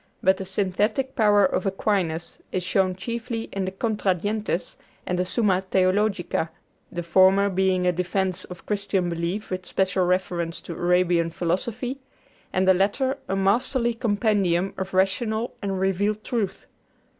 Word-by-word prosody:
But 190 Hz, 0 st, +4 dB
the 190 Hz, -, -5 dB
synthetic 205 Hz, +7 st, 0 dB
power 205 Hz, -4 st, +5 dB
of 185 Hz, +1 st, 0 dB
Aquinas 190 Hz, -4 st, -1 dB
is 185 Hz, -, -1 dB
shown 185 Hz, 0 st, +1 dB
chiefly 230 Hz, +3 st, -4 dB
in 195 Hz, -1 st, -1 dB
the 190 Hz, -, -3 dB
'Contra 205 Hz, -2 st, 0 dB
Gentes' 205 Hz, -2 st, -2 dB, 0.3 s
and 180 Hz, 0 st, -1 dB
the 180 Hz, -, +1 dB
'Summa 190 Hz, -2 st, +2 dB
Theologica,' 190 Hz, -2 st, +1 dB, 0.4 s
the 175 Hz, 0 st, -4 dB
former 190 Hz, +3 st, +4 dB
being 190 Hz, -1 st, +2 dB
a 180 Hz, -, +4 dB
defense 185 Hz, +1 st, -1 dB
of 180 Hz, -1 st, -11 dB
Christian 200 Hz, -3 st, 0 dB
belief 170 Hz, +6 st, -3 dB
with 185 Hz, 0 st, -4 dB
special 190 Hz, -1 st, +1 dB
reference 175 Hz, -2 st, -1 dB
to 170 Hz, -, -7 dB
Arabian 175 Hz, -1 st, +2 dB
philosophy, 220 Hz, +10 st, -2 dB, 0.5 s
and 185 Hz, 0 st, +1 dB
the 190 Hz, -, +7 dB
latter 210 Hz, +8 st, +1 dB
a 195 Hz, -, +1 dB
masterly 235 Hz, +5 st, +1 dB
compendium 205 Hz, -6 st, +1 dB
of 190 Hz, 0 st, -5 dB
rational 220 Hz, +5 st, +1 dB
and 195 Hz, -2 st, -2 dB
revealed 205 Hz, +3 st, 0 dB
truth. 220 Hz, -6 st, -2 dB
190 Hz, 145 wpm, -25 LUFS, 180-210 Hz, 0.5 s, the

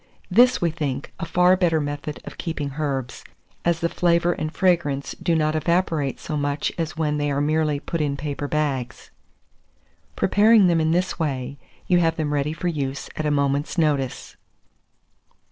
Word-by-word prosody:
This, 245 Hz, +6 st, +5 dB
we 170 Hz, -2 st, +1 dB
think, 145 Hz, -4 st, -4 dB
a -, -, -3 dB
far 180 Hz, +2 st, +4 dB
better 175 Hz, -4 st, +2 dB
method 145 Hz, 0 st, -4 dB
of -, -, -10 dB
keeping 155 Hz, -5 st, -3 dB
herbs, 135 Hz, -4 st, -3 dB, 0.4 s
as 170 Hz, -1 st, +1 dB
the 170 Hz, -, +2 dB
flavour 170 Hz, 0 st, +2 dB
and 155 Hz, -1 st, -4 dB
fragrance 165 Hz, -7 st, +1 dB
do 170 Hz, -, +1 dB
not 155 Hz, -1 st, +1 dB
evaporate 160 Hz, -4 st, 0 dB
so 155 Hz, -, -5 dB
much 145 Hz, 0 st, -1 dB
as 165 Hz, 0 st, -4 dB
when 150 Hz, -2 st, 0 dB
they 145 Hz, 0 st, 0 dB
are 140 Hz, 0 st, 0 dB
merely 150 Hz, 0 st, +1 dB
put 165 Hz, +2 st, -3 dB
in 140 Hz, -2 st, -1 dB
paper 145 Hz, 0 st, -4 dB
bags. 140 Hz, -5 st, -2 dB, 1.0 s
Preparing 210 Hz, +1 st, +5 dB
them 170 Hz, -2 st, +3 dB
in 160 Hz, -, +1 dB
this 180 Hz, +3 st, 0 dB
way, 140 Hz, -3 st, -3 dB, 0.3 s
you 180 Hz, -1 st, +3 dB
have 165 Hz, -1 st, +2 dB
them 150 Hz, -2 st, -2 dB
ready 145 Hz, +1 st, 0 dB
for 165 Hz, +3 st, -4 dB
use 140 Hz, -4 st, -3 dB
at 155 Hz, -, -2 dB
a -, -, +2 dB
moment's 140 Hz, +3 st, 0 dB
notice. 145 Hz, -5 st, -1 dB
155 Hz, 170 wpm, -23 LUFS, 145-170 Hz, 1.0 s, This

